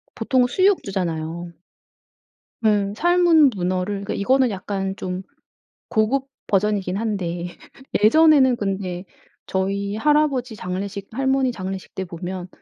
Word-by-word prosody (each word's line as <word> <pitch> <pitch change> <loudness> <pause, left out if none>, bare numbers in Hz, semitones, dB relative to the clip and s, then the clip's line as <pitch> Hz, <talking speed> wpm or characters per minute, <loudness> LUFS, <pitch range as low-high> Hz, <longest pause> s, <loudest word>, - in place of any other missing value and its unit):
보통은 255 -2 +2
수육 375 +9 +3
주잖아요. 170 -3 -3 1.1
음. 205 -2 +2
삶은 335 +1 +4
문어를 185 +2 -2
이거는 255 +4 +2
약간 195 -1 -3
좀 185 0 -4 0.7
고급 255 +5 +1 0.2
버전이긴 195 -2 +1
한데 180 -6 -2 0.6
예전에는 280 0 +6
근데 190 -3 -3 0.4
저희 200 +2 -1
할아버지 275 -3 +1
장례식 195 +1 -5
할머니 265 +1 +1
장례식 190 -3 -6
때 190 - -3
보면 180 +1 -6
200 Hz, 250 characters per minute, -22 LUFS, 185-260 Hz, 1.1 s, 예전에는